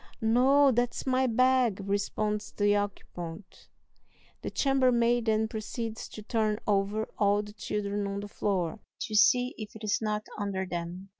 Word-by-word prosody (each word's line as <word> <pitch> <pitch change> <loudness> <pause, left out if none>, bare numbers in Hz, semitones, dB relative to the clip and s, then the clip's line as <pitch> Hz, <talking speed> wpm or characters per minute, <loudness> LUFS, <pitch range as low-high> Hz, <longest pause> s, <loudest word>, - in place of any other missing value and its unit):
"No, 260 +5 +4
that's 240 0 -1
my 260 0 +2
bag," 255 -3 +3
responds 210 +1 -1
the 205 0 +2
occupant. 185 -3 -6 0.7
The - - -4
chambermaid 245 -3 +2
then 220 0 +2
proceeds 220 +1 -5
to 215 - -9
turn 215 -1 0
over 205 +2 0
all 205 0 +3
the 210 0 -11
children 205 -1 -3
on 200 0 -3
the 205 - -6
floor, 195 -3 -2 0.2
to 215 - -4
see 245 +4 +4
if 215 +1 -7
it 220 - -10
is 210 - +1
not 215 -1 -2
under 195 -2 -2
them. 175 +2 -5
215 Hz, 150 wpm, -29 LUFS, 200-235 Hz, 0.7 s, No